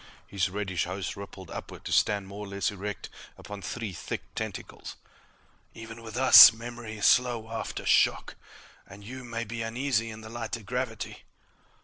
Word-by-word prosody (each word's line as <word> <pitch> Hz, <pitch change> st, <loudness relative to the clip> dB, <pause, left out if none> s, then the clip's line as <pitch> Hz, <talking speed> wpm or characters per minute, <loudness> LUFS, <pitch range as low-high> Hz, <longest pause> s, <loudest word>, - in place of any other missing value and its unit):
His 95 Hz, -2 st, -1 dB
reddish 95 Hz, -3 st, -2 dB
host 90 Hz, +2 st, -4 dB
rippled 95 Hz, -3 st, -10 dB
upward -, -, -8 dB
to -, -, -5 dB
stand 100 Hz, -2 st, +2 dB
more 100 Hz, +1 st, -7 dB
or -, -, -10 dB
less 100 Hz, +1 st, -1 dB
erect 100 Hz, -1 st, -6 dB, 0.3 s
upon 105 Hz, -1 st, -9 dB
three 110 Hz, +2 st, -5 dB
thick -, -, -5 dB
tentacles. 110 Hz, -5 st, -6 dB, 0.8 s
"Even 115 Hz, 0 st, -9 dB
with 115 Hz, +1 st, -8 dB
us, 130 Hz, +1 st, +11 dB
memory 115 Hz, -1 st, -8 dB
is 105 Hz, -, -1 dB
slow 120 Hz, -3 st, +3 dB
after 115 Hz, -, -5 dB
shock. -, -, +3 dB, 0.5 s
And 100 Hz, +1 st, -13 dB
you 130 Hz, +4 st, -8 dB
may 115 Hz, -1 st, -4 dB
be 115 Hz, +1 st, -6 dB
uneasy 115 Hz, 0 st, -1 dB
in 110 Hz, 0 st, -9 dB
the 110 Hz, -, -10 dB
lighter 115 Hz, 0 st, -5 dB
gravity." 125 Hz, 0 st, -4 dB
110 Hz, 160 wpm, -28 LUFS, 100-115 Hz, 0.8 s, us